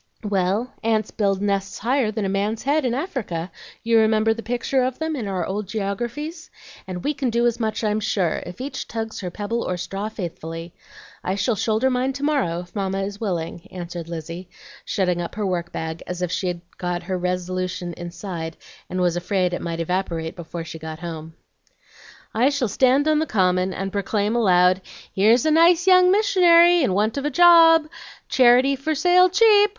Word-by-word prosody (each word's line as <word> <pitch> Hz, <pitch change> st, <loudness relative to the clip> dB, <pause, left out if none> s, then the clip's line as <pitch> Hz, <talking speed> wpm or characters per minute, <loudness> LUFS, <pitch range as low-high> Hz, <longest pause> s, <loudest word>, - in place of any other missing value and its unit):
"Well, 200 Hz, +4 st, -1 dB
ants 220 Hz, -1 st, 0 dB
build 200 Hz, -2 st, 0 dB
nests 195 Hz, -1 st, -1 dB
higher 250 Hz, +1 st, +1 dB
than 215 Hz, -1 st, -3 dB
a -, -, 0 dB
man's 200 Hz, +3 st, -1 dB
head 285 Hz, +1 st, +1 dB
in 240 Hz, -1 st, 0 dB
Africa; 225 Hz, -, -4 dB, 0.3 s
you 230 Hz, 0 st, +4 dB
remember 220 Hz, 0 st, +3 dB
the 230 Hz, -, -7 dB
picture 245 Hz, +3 st, -1 dB
of 255 Hz, 0 st, -1 dB
them 320 Hz, 0 st, -2 dB
in 235 Hz, -7 st, -4 dB
our 185 Hz, -3 st, -2 dB
old 200 Hz, +1 st, -4 dB
geographies? 240 Hz, -, -4 dB, 0.4 s
And 180 Hz, -1 st, -6 dB
we 295 Hz, -, 0 dB
can 275 Hz, -3 st, -2 dB
do 235 Hz, +1 st, +1 dB
as 240 Hz, 0 st, +1 dB
much, 220 Hz, 0 st, -2 dB
I'm 210 Hz, 0 st, +1 dB
sure, 200 Hz, -6 st, -1 dB
if 180 Hz, -, -10 dB
each 270 Hz, +3 st, -5 dB
tugs 225 Hz, -1 st, -5 dB
her 180 Hz, -, -4 dB
pebble 210 Hz, +5 st, -3 dB
or 180 Hz, -, -2 dB
straw 195 Hz, +4 st, -4 dB
faithfully. 165 Hz, -4 st, -7 dB, 0.5 s
I 185 Hz, -, -1 dB
shall 215 Hz, +4 st, 0 dB
shoulder 220 Hz, +5 st, +1 dB
mine 255 Hz, +2 st, 0 dB
to 280 Hz, +1 st, -6 dB
morrow 265 Hz, -, 0 dB
if 180 Hz, +3 st, -15 dB
Mamma 195 Hz, -1 st, -1 dB
is 200 Hz, +2 st, -6 dB
willing," 170 Hz, -5 st, -4 dB
answered 175 Hz, -2 st, -7 dB
Lizzie, 170 Hz, +2 st, -7 dB, 0.4 s
shutting 180 Hz, -3 st, 0 dB
up 170 Hz, -, -6 dB
her 210 Hz, -1 st, -2 dB
work 175 Hz, -2 st, -2 dB
bag 160 Hz, 0 st, -5 dB
as 180 Hz, 0 st, -4 dB
if 175 Hz, -, -2 dB
she 180 Hz, -2 st, -2 dB, 0.2 s
had 175 Hz, 0 st, -3 dB
her 185 Hz, +1 st, -3 dB
resolution 180 Hz, 0 st, -3 dB
inside 175 Hz, -1 st, -6 dB, 0.3 s
and 185 Hz, -, -2 dB
was 175 Hz, -1 st, +1 dB
afraid 180 Hz, 0 st, 0 dB
it -, -, -3 dB
might 170 Hz, -1 st, -4 dB
evaporate 165 Hz, -2 st, -2 dB
before 170 Hz, -1 st, -7 dB
she 165 Hz, 0 st, -9 dB
got 160 Hz, 0 st, -7 dB
home. 160 Hz, -1 st, -7 dB, 1.0 s
"I 245 Hz, +5 st, +3 dB
shall 280 Hz, -5 st, -1 dB
stand 265 Hz, +7 st, +3 dB
on 310 Hz, -1 st, +3 dB
the 315 Hz, -, -1 dB
Common, 185 Hz, -2 st, +1 dB
and 195 Hz, +1 st, -4 dB
proclaim 205 Hz, +2 st, -1 dB
aloud, 185 Hz, -4 st, +4 dB, 0.3 s
'Here's 225 Hz, +6 st, +4 dB
a 315 Hz, -, +3 dB
nice 335 Hz, +2 st, +5 dB
young 365 Hz, -1 st, +6 dB
missionary, 350 Hz, -4 st, +5 dB
in 200 Hz, -10 st, +1 dB
want 215 Hz, +5 st, 0 dB
of 280 Hz, -, -5 dB
a -, -, +1 dB
job! 330 Hz, 0 st, +7 dB, 0.4 s
Charity 255 Hz, +2 st, +5 dB
for 305 Hz, +4 st, -2 dB
sale 360 Hz, +4 st, +5 dB
cheap! 415 Hz, +1 st, +5 dB
205 Hz, 190 wpm, -22 LUFS, 180-260 Hz, 1.0 s, job